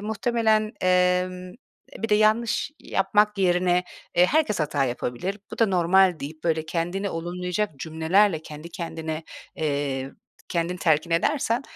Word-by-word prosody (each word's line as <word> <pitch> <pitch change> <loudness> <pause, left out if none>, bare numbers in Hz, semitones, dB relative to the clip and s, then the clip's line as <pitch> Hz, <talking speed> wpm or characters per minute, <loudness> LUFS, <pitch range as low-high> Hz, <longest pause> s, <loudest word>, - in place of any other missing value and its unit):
muhtemelen, 220 0 +1
emm, 180 0 +1
eee, 240 - -17
bir 225 - -1
de 210 - +4
yanlış 215 +5 +2
yapmak 210 +2 +1
yerine, 180 -1 +2 0.3
eee, 180 - +6
"Herkes 265 - +1
hata 145 -2 +1
yapabilir, 125 +10 -3
bu - - -8
da 225 - +4
normal." 185 -1 +3
deyip 155 +3 -8
böyle 160 -2 0
kendini 175 +4 -2
olumlayacak 180 +4 -2
cümlelerle 160 +5 +2
kendi 155 +1 -9
kendine, 160 -3 -5 0.3
eee, 140 -3 -2 0.4
kendin 170 +1 -1
telkin 165 -2 +1
edersen, 240 - +1
180 Hz, 135 wpm, -25 LUFS, 160-210 Hz, 0.4 s, eee